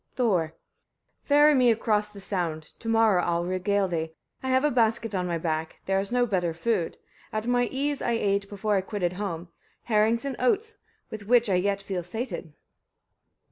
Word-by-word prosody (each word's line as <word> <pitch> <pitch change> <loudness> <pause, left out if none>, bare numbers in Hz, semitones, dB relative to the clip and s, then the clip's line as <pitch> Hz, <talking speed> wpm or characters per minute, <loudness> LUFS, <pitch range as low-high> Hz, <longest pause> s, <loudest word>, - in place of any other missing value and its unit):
Thor. 180 -10 +1 0.7
3. - - -31
Ferry 295 +1 +6
me 255 -3 +5
across 215 -2 +1
the 205 -1 -12
sound, 175 -5 -2 0.2
to 225 - -5
morrow 225 -5 +4
I'll 170 0 0
regale 190 +2 +1
thee. 160 -2 -3 0.3
I 260 - -3
have 260 +1 +3
a 300 - +3
basket 225 -2 +1
on 180 -2 -1
my 170 -1 -1
back: 160 -1 -3
there 195 0 +1
is 195 +2 -3
no 245 0 +3
better 180 -7 -1
food: 185 -1 -1 0.3
at 215 0 -2
my 245 0 +2
ease 280 +3 -2
I 235 - 0
ate, 200 -3 0
before 210 +1 -1
I 190 - +2
quitted 185 -2 -2
home, 180 -3 -4 0.3
herrings 225 +2 +2
and 275 -2 -2
oats, 410 - +1 0.3
with 205 -2 -7
which 240 -2 +4
I - - +3
yet 200 +2 +1
feel 190 -3 -3
sated. 180 -2 -5
205 Hz, 185 wpm, -27 LUFS, 180-235 Hz, 0.7 s, Ferry